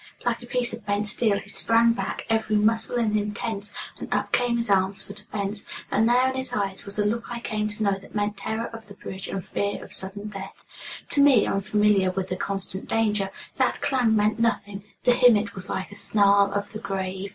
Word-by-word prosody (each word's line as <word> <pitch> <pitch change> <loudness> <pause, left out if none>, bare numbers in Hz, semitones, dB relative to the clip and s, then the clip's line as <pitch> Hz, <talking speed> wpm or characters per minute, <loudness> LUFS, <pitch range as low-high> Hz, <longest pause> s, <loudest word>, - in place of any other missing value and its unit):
Like 240 -1 0
a 240 - -10
piece 245 -1 -1
of 230 -1 -7
bent 205 +1 0
steel 210 0 +2
he 200 - -8
sprang 230 +2 +4
back, - - -3
every 220 -2 +1
muscle 225 +3 +2
in 230 -3 +2
him 210 -1 -1
tense, 205 -2 -4 0.3
and - - -7
up - - 0
came 245 -1 +2
his 235 0 -1
arms 195 0 +2
for 200 - -8
defense, 205 0 -4 0.3
and 225 +2 +3
there 250 +2 +4
in 260 - -1
his 260 0 -4
eyes 195 -2 -1
was 200 0 -4
the 210 - +1
look 230 +3 0
I 240 -1 -4
came 215 -2 -2
to 215 +1 -3
know 200 -1 +1
that 195 - -15
meant 205 0 0
terror 220 +3 -3
of 225 -1 -9
the 200 - -12
bridge, 190 -1 -7
and 190 -3 -4
fear 200 0 -2
of - - -8
sudden 200 +2 -3
death. 195 -1 -9 0.4
To 285 - +2
me, 275 -6 +6
unfamiliar 205 -1 +2
with 185 0 -3
the 185 - -1
constant 190 0 -3
danger, 210 -3 +1 0.3
that - - +2
clang 245 -5 +2
meant 210 +1 +2
nothing; 205 -3 0 0.2
to 245 - +5
him 245 -2 +6
it 215 +2 -3
was 185 -1 -6
like 190 - -3
a - - -10
snarl 200 -1 +4
of 200 0 -3
the 215 - -5
grave. 190 -1 -3
210 Hz, 225 wpm, -25 LUFS, 200-230 Hz, 0.4 s, me